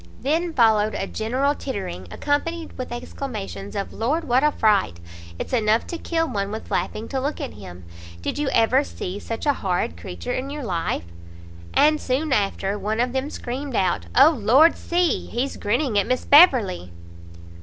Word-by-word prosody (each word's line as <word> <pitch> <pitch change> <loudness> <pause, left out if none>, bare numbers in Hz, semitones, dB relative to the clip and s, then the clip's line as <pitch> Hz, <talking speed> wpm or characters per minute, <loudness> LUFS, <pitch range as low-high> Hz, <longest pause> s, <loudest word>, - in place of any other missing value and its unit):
Then 330 +5 0
followed 220 -4 +3
a - - -2
general 255 +8 0
tittering, 195 - -5
accompanied 315 - -2
with 255 -2 -6
exclamations 215 - -6
of 200 - -4
"Lord, 290 +9 -1
what 255 -2 +2
a 300 - +4
fright!" 205 - +2 0.4
"It's - - -6
enough 220 -1 +2
to 340 - -6
kill 325 -1 -1
one 200 -6 -2
with 220 +2 -7
laughing 220 +1 -2
to 265 -1 -2
look 285 +3 -2
at - - -5
him!" 90 -3 -11 0.4
"Did 85 - -3
you 295 -2 0
ever 250 +5 +3
see 195 -7 -6
such 225 +5 -5
a 290 - +4
horrid 180 - -2
creature 85 0 -6
in 265 +2 -3
your 290 0 -5
life?" 170 - -2 0.7
And 305 +1 +4
soon 275 +3 0
after, 200 -1 0
one 215 +2 -2
of 245 +1 +1
them 265 +2 -1
screamed 265 -1 -5
out 185 -3 0
"O 280 +5 +8
Lord, 270 +5 +5
see! 345 -3 0
he's 255 +4 -2
grinning 230 +1 0
at 200 - 0
Miss 255 - -1
Beverley!" 250 - +5
245 Hz, 175 wpm, -23 LUFS, 200-285 Hz, 0.7 s, O